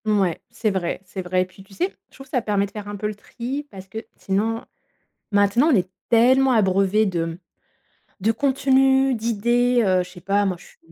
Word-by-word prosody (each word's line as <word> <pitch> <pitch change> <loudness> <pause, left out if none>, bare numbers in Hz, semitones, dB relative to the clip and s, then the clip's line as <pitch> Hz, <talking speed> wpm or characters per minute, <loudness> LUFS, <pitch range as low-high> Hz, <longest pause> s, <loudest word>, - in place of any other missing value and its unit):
Ouais, 200 -5 +1
c'est 215 -2 -1
vrai, 185 -3 -2
c'est 190 0 -6
vrai 185 0 +1
et - - -7
puis 185 +1 -16
tu 195 0 -17
sais, 365 +3 -1
je - - -22
trouve 270 - -11
que 265 - -24
ça 250 - +1
permet 205 -2 +1
de 200 - -11
faire 210 -1 -7
un 205 - -5
peu 205 - -5
le 210 - -3
tri 255 +7 -6
parce 190 -2 -11
que 220 +4 -6 0.2
sinon, 220 +4 -1 0.7
maintenant 205 +8 +4
on - - +5
est 185 -1 0 0.2
tellement 260 +3 +5
abreuvés 195 -1 +3
de 165 -4 -2 0.8
de 220 +4 +2
contenus, 270 +1 +3
d'idées, 235 +2 +2
heu, 185 -2 +3
je 180 - -10
sais 180 0 -13
pas, 200 +2 +1
moi 185 -2 -1
je - - -16
suis - - -19
210 Hz, 215 wpm, -22 LUFS, 190-245 Hz, 0.8 s, on